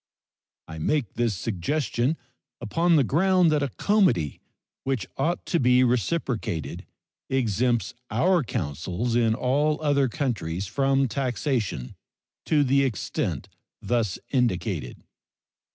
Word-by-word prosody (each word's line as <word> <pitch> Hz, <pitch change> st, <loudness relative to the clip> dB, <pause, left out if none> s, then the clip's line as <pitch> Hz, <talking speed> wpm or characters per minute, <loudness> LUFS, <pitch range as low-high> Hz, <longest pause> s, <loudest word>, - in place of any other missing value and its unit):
I 80 Hz, 0 st, -8 dB
make 130 Hz, -, 0 dB
this 115 Hz, -3 st, 0 dB
suggestion 120 Hz, -, -1 dB, 0.4 s
upon 165 Hz, +10 st, +2 dB
the 145 Hz, -, +5 dB
ground 175 Hz, +5 st, +3 dB
that 150 Hz, -1 st, +2 dB
a 140 Hz, -, 0 dB
comity 175 Hz, -, +1 dB, 0.4 s
which 130 Hz, -7 st, -1 dB
ought 165 Hz, +6 st, -1 dB
to 170 Hz, -, +1 dB
be 125 Hz, 0 st, +5 dB
reciprocated 120 Hz, -, -1 dB, 0.4 s
exempts 120 Hz, -2 st, +1 dB, 0.2 s
our 175 Hz, -, +3 dB
consuls 90 Hz, -, -3 dB
in 115 Hz, -2 st, +3 dB
all 145 Hz, +5 st, +1 dB
other 140 Hz, -3 st, +2 dB
countries 105 Hz, -, -2 dB
from 135 Hz, +5 st, +1 dB
taxation 120 Hz, -, -2 dB, 0.5 s
to 150 Hz, -2 st, +4 dB
the 140 Hz, +1 st, +3 dB
extent 130 Hz, -6 st, -2 dB, 0.3 s
thus 110 Hz, -3 st, 0 dB
indicated. 95 Hz, -, -1 dB
125 Hz, 110 wpm, -25 LUFS, 105-145 Hz, 0.5 s, the